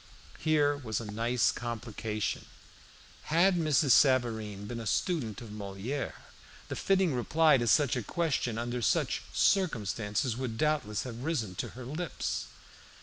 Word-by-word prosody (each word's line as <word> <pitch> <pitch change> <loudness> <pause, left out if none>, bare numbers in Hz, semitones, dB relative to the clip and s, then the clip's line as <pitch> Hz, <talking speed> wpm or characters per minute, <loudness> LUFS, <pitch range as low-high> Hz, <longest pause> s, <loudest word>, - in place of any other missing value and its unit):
Here 150 -2 +3
was 110 -7 -3
a 115 - -6
nice 115 +2 +2
complication. 110 -2 -4 0.8
Had 180 +4 +4
Mrs. 155 -4 +3
Savareen 110 -7 +3
been 115 +3 -5
a 115 - -5
student 125 - -1
of 115 -3 -9
Moliere, 105 +6 -4 0.5
the - - -3
fitting 190 -5 +2
reply 150 +5 +4
to 120 - -1
such 135 +4 +4
a 125 - -1
question 135 -3 -1
under 120 +1 -2
such 110 - +1
circumstances 115 - +1
would 120 -3 -4
doubtless 145 -9 0
have 120 -2 -7
risen 130 - -1
to - - -4
her 130 - -7
lips. 155 +6 -3
120 Hz, 140 wpm, -30 LUFS, 110-150 Hz, 0.8 s, Had